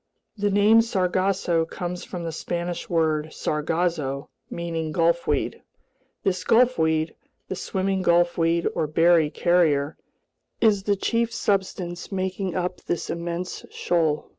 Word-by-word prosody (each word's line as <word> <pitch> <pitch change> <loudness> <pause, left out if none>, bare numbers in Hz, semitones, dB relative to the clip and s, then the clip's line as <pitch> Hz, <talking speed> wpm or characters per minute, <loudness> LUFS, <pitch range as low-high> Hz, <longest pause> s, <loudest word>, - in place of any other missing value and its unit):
The 205 -1 0
name 205 +3 +5
Sargasso 185 -4 +1
comes 175 +2 -5
from 175 -2 -6
the 165 - -3
Spanish 175 +2 -4
word 155 -2 +1
"sargazo," 155 -3 -1 0.2
meaning 165 -2 -3
gulfweed. 165 -3 +1 0.6
This 185 -1 0
gulfweed, 160 -10 +3 0.4
the - - -2
swimming 190 +1 -1
gulfweed 170 -1 +2
or 155 - -1
berry 165 0 +4
carrier, 155 -4 +2 0.6
is 215 -3 +4
the 205 +1 +1
chief 230 +3 0
substance 190 -4 -2
making 190 -1 -2
up 180 0 -2
this 175 - -3
immense 170 +1 -4
shoal. 160 -4 0
175 Hz, 115 wpm, -24 LUFS, 165-190 Hz, 0.6 s, name